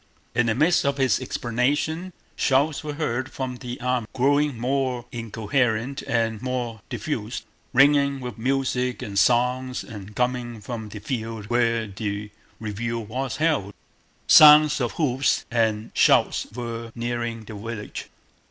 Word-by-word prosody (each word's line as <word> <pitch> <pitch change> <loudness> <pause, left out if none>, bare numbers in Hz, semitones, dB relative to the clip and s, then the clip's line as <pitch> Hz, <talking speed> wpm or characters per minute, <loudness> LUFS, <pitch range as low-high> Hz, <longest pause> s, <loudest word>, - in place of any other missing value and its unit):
In 120 0 +2
the 110 - +1
midst 155 +7 +3
of 140 0 0
his 130 -2 +2
explanation 140 +8 -1 0.2
shouts 140 +3 +1
were 150 -1 -4
heard 130 -4 -2
from 130 -2 -4
the 125 0 -7
army, 125 -2 -1
growing 145 +1 +2
more 130 -1 -1
incoherent 115 +3 -1
and 115 -2 0
more 125 -4 -3
diffused, 120 -6 -4 0.3
mingling 140 +1 +4
with 125 -3 -6
music 125 +1 -1
and 100 -1 -1
songs 125 +4 +2
and 105 -3 -10
coming 125 -1 -1
from 110 -1 -6
the 105 - -8
field 110 -1 -5
where 115 -1 +2
the 105 0 -5 0.3
review 115 +2 -3
was 125 +5 -4
held. 140 -10 0 0.5
Sounds 150 -1 +8
of 120 - -1
hoofs 135 -4 +1
and 110 -2 0
shouts - - +3
were 115 -1 -6
nearing 120 -1 -3
the 110 - -9
village. 110 0 -6
120 Hz, 135 wpm, -24 LUFS, 115-135 Hz, 0.5 s, Sounds